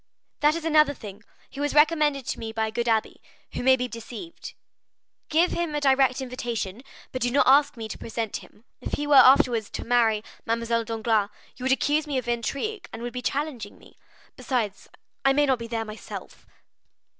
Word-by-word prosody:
"That 300 +1 +3
is 335 -1 -5
another 305 -3 +4
thing: 205 -3 -10 0.3
he 275 - -9
was 290 0 -1
recommended 300 -3 +3
to - - -4
me 225 -1 -5
by 220 0 -1
a 220 - -4
good 235 +1 -2
abbé, 225 -1 +1 0.4
who - - -3
may 260 +1 +5
be 250 -1 -2
deceived. 240 +8 -9 0.7
Give 330 +3 +3
him 340 -3 -2
a - - +1
direct 270 -2 +3
invitation, 240 -5 -4 0.3
but 255 - -4
do 245 - +2
not 275 +4 +3
ask 280 0 +5
me 225 -1 -5
to - - -8
present 225 -2 -3
him. 210 - -16 0.2
If - - -7
he 295 - -1
were 290 - +2
afterwards 250 -5 +6
to - - -6
marry 230 -3 +2 0.2
Mademoiselle 230 0 -1
Danglars, 220 -2 0 0.3
you 255 - -7
would 265 - +2
accuse 295 +3 +1
me 285 -3 -1
of 255 -1 -3
intrigue, 280 - -3
and 235 - -7
would 240 - -5
be 250 - -4
challenging 265 -6 -3
me,—besides, 225 -7 -6 0.3
I 270 0 +4
may 290 +1 +3
not 265 -3 +1
be 230 - -6
there 225 -1 -3
myself." 215 0 -9
250 Hz, 190 wpm, -25 LUFS, 230-290 Hz, 0.7 s, afterwards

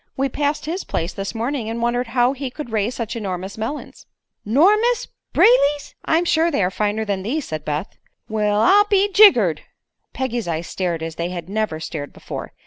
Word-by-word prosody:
We 270 +1 +1
passed 290 +3 -1
his 345 +5 -3
place 165 +2 -3
this 195 +3 -5
morning 235 0 -2
and 230 +1 -3
wondered 240 +1 0
how 245 +2 +2
he 275 -1 -5
could 250 -1 -8
raise 220 +2 0
such 230 -1 -4
enormous 190 -3 -4
melons." 225 +7 -6 0.4
"'Normous! 425 - +3 0.2
Brayley's!" 295 -12 +4
"I'm 330 +2 +2
sure 330 0 +3
they 275 - +1
are 180 - +1
finer 210 +2 -1
than 200 -2 -2
these," 260 +10 -3
said 155 -1 -5
Beth. 150 +5 -4 0.3
"Well, 210 -1 +1
I'll 405 - +6
be 405 -1 +2
jiggered!" 235 - +6 0.5
Peggy's 245 -5 -3
eyes 165 0 -2
stared 170 -3 -3
as 160 0 -6
they 170 +1 -2
had 175 -1 -6
never 210 -6 -2
stared 155 -3 -6
before. - - -7
230 Hz, 185 wpm, -21 LUFS, 190-295 Hz, 0.5 s, I'll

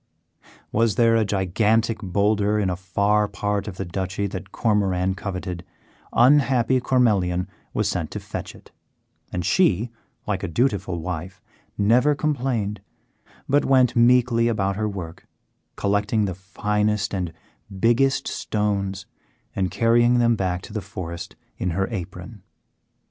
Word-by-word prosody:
Was 115 -1 +2
there 115 -2 +4
a 115 - +3
gigantic 105 +3 +1
boulder 105 +2 +1
in 100 -3 +1
a - - -1
far 100 +3 +1
part 105 0 -2
of 95 -3 -6
the 95 - -3
Duchy 95 +3 -3
that 95 0 -6
Cormoran 95 -4 +1
coveted, 90 -2 -5 0.5
unhappy 130 -1 +4
Cormelian 100 -9 +2 0.2
was - - 0
sent - - -2
to - - -5
fetch - - -7
it; - - -18 0.6
and 90 -1 -3
she, 115 - +2 0.3
like 100 -3 -2
a 100 - -3
dutiful 95 -2 0
wife, 90 +2 -5 0.4
never 125 +8 +4
complained, 125 -9 -1 0.7
but 145 +1 +3
went 130 -2 +3
meekly 120 -1 +4
about 100 -4 0
her 105 +1 -1
work, 90 -5 -8 0.5
collecting 105 +2 +1
the 95 - -2
finest 105 +3 -1
and 90 -3 -2 0.5
biggest 135 +5 +2
stones 100 -2 -2 0.5
and 95 -2 0
carrying 120 +5 +3
them 120 -1 +3
back 90 -2 -2
to - - -10
the 110 - -2
forest 90 -4 -7 0.2
in 90 - -1
her 95 0 +1
apron. 95 -6 -7
105 Hz, 135 wpm, -23 LUFS, 95-115 Hz, 0.7 s, there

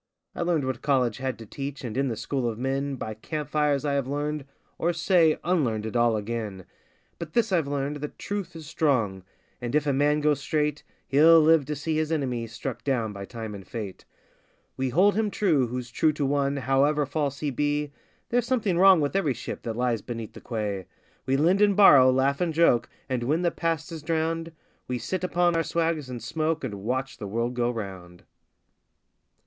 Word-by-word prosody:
I - - -5
learned 170 -5 +1
what 130 -2 -3
college 130 -6 +1
had 130 -1 -3
to 115 - -10
teach, 140 +5 -6
and 115 -3 -5
in 135 +1 +1
the 115 - -2
school 130 0 -1
of 110 - -5
men 135 +2 -1
By 110 -4 -5
camp 150 +7 -5
fires 150 -2 +1
I 145 - +1
have 140 -2 0
learned, 145 +1 -2 0.3
or, 170 +1 +1
say, 170 -2 +3
unlearned 125 -12 0
it 110 - -5
all 120 -2 +3
again; 105 -3 -4 0.5
But 160 -2 -7
this 230 -3 +2
I've 165 -6 +2
learned, 140 +1 -2
that 150 0 -7
truth 200 -4 -4
is 160 -1 -8
strong, 135 - 0 0.4
and 120 +2 -3
if 150 -1 +2
a 140 - +1
man 145 +2 +2
go 150 0 +3
straight 150 +1 -1 0.3
He'll 160 +4 +7
live 160 -2 +5
to 150 +2 -3
see 155 +2 -2
his 155 0 -1
enemy 125 -7 -1
struck 115 +3 -6
down 115 -6 -1
by 100 -1 -7
time 110 -1 -7
and 100 -1 -8
fate! 100 -1 -7 0.7
We 130 0 -1
hold 190 +10 +4
him 215 0 0
true 160 -11 +2
who's 125 0 -5
true 155 +5 +2
to 145 -1 -1
one 140 0 +1
however 140 +3 +2
false 140 -1 -2
he 150 -2 -1
be 145 +2 -1 0.4
(There's 240 0 +1
something 210 -9 +1
wrong 190 -3 +7
with 145 +4 -1
every 155 -10 +1
ship - - -6
that 115 -1 -4
lies 120 -3 0
beside 115 -2 -6
the - - -11
quay); 105 -5 -3 0.4
We 135 +1 +2
lend 175 +7 +3
and 205 -1 +4
borrow, 140 -10 +8
laugh 135 +3 +2
and 165 -3 0
joke, 160 -8 +3 0.2
and 130 -2 -1
when 150 +8 0
the 170 - +2
past 165 -1 -2
is 160 -2 -6
drowned, 165 +1 -1 0.4
We 125 - -2
sit 170 +11 -3
upon 175 -1 +2
our 165 - +3
swags 165 -4 -1
and 120 -3 -6
smoke 155 +5 -1
and 105 -6 -5
watch 130 +4 -2
the 105 - -5
world 115 +4 -1
go 120 -1 0
round. 95 -6 -7
140 Hz, 205 wpm, -26 LUFS, 120-160 Hz, 0.7 s, borrow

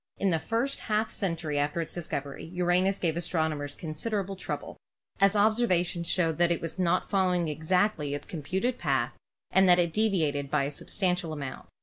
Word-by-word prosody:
In 195 -2 +1
the 165 - +2
first 235 - -1
half 215 +1 0
century 165 -6 -2
after 145 +3 0
its 165 - -3
discovery 145 -5 -4
Uranus 180 +3 +1
gave 165 -3 0
astronomers 160 -4 -1
con 155 -2 -6
siderable 195 +3 -2
trouble, 190 - -5 0.4
as 195 +1 +4
observations 190 -5 +2
showed 165 -3 +1
that 175 -1 +4
it 170 - +1
was 165 +2 -5
not 180 0 +2
following 180 -4 +2
exactly 155 0 +1
its 145 - -6
computed 190 - -2
path 135 -7 0 0.3
and 190 0 +5
that 175 - +7
it 170 -2 +1
deviated 160 -10 +1
by 150 0 +2
a 140 - -2
substantial 180 +2 -1
amount. 140 -3 -6
175 Hz, 175 wpm, -28 LUFS, 155-195 Hz, 0.4 s, that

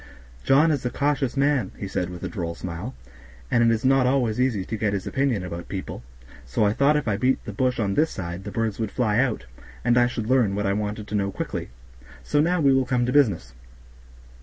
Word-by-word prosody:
John 150 +4 +4
is 145 -4 -1
a 125 - 0
cautious 140 -1 -1
man," 140 -7 +2
he 100 - -5
said, 90 -2 -2
with 90 -1 -8
a - - -1
droll 85 -5 -4
smile, 90 +9 -6 0.6
"and 120 - +4
it 115 - +5
is 115 +2 -1
not 135 -1 +4
always 125 -3 +1
easy 115 -8 0
to 110 - -4
get 105 -1 0
his 100 -2 -3
opinion 130 -8 0
about 85 -1 -6
people, 95 -9 -5 0.4
so 65 - 0
I 105 - +2
thought 140 +5 +3
if 150 - -3
I 105 -2 +1
beat 130 +3 +1
the - - -6
bush 130 -2 0
on 100 -3 0
this 155 +8 +2
side 85 0 -6
the - - -6
birds 115 -2 -2
would 110 -2 -1
fly 110 -1 +1
out, 125 - 0 0.4
and 120 0 +4
I 120 - +4
should 115 -3 -4
learn 120 -6 +3
what 105 0 -1
I 100 - +1
wanted 105 +1 -3
to - - -7
know 100 -1 0
quickly; - - -4 0.5
so 145 - +2
now 175 +3 +2
we 140 -3 +4
will 135 -1 +2
come 125 -2 +1
to 125 - -1
business. 105 - +2
115 Hz, 235 wpm, -24 LUFS, 100-135 Hz, 0.6 s, it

